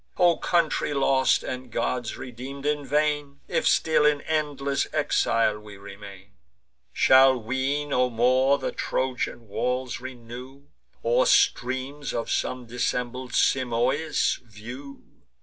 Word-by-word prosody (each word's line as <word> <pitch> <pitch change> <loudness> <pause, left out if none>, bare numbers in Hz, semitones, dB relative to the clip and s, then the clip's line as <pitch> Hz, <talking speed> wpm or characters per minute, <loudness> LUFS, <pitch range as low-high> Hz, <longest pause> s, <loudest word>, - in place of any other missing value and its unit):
O 175 -2 +4
country 165 -4 0
lost, 135 -2 +3
and 130 0 -6
gods 120 +1 -2
redeem'd 130 +3 -8
in 150 0 0
vain, 145 0 0
If - - 0
still 160 -2 +3
in 150 -1 +3
endless 145 -3 -1
exile 115 -7 +1
we 105 -1 -12
remain! 100 0 -12 0.6
Shall 130 0 +6
we 130 +5 -1
no 125 -3 +1
more 130 +4 +3
the - - -3
Trojan 125 -3 -3
walls 125 +4 -2
renew, 125 +2 -10 0.4
Or - - +3
streams 130 +3 +1
of 115 - -3
some 125 -1 -2
dissembled 125 +1 -3
Simois 130 +4 +1
view! 120 +5 -10
130 Hz, 115 wpm, -25 LUFS, 120-140 Hz, 0.6 s, Shall